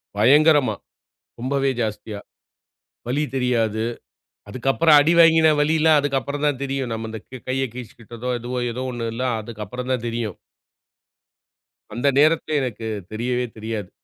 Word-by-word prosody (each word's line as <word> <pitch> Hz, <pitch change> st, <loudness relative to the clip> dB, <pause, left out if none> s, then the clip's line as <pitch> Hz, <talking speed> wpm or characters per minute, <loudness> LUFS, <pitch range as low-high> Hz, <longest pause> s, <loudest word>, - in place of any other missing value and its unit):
பயங்கரமா, 145 Hz, +6 st, +4 dB, 0.7 s
ரொம்பவே 135 Hz, +2 st, 0 dB
ஜாஸ்தியா. 105 Hz, -1 st, -4 dB, 0.9 s
வலி 145 Hz, +5 st, 0 dB
தெரியாது. 115 Hz, -4 st, 0 dB, 0.6 s
அதுக்கு 125 Hz, +5 st, -4 dB
அப்புறம் 160 Hz, +1 st, +5 dB
அடிவாங்கின 160 Hz, 0 st, +5 dB
வலிலாம் 155 Hz, +1 st, +4 dB
அதுக்கு 140 Hz, -1 st, 0 dB
அப்புறம் 140 Hz, +3 st, -4 dB
தான் 145 Hz, -3 st, 0 dB
தெரியும். 135 Hz, -2 st, -3 dB
நம்ம 110 Hz, 0 st, -4 dB
இந்த 110 Hz, -, -6 dB
க்க 130 Hz, -2 st, -11 dB
கைய 135 Hz, +1 st, 0 dB
கிழிச்சிகிட்டதோ, 120 Hz, 0 st, -8 dB
எதுவோ 125 Hz, +2 st, -4 dB
ஏதோ 125 Hz, +2 st, -5 dB
1ல்லாம் 115 Hz, +1 st, -2 dB
அதுக்கு 110 Hz, -1 st, -7 dB
அப்புறம் 125 Hz, +5 st, -6 dB
தான் 125 Hz, -2 st, -2 dB
தெரியும். 115 Hz, -4 st, -3 dB, 1.6 s
அந்த 120 Hz, +5 st, -1 dB
நேரத்திலே 155 Hz, +1 st, +3 dB
எனக்கு 115 Hz, -3 st, -4 dB, 0.2 s
தெரியவே 125 Hz, +3 st, -1 dB
தெரியாது. 110 Hz, -3 st, -5 dB
125 Hz, 130 wpm, -22 LUFS, 115-145 Hz, 1.6 s, அப்புறம்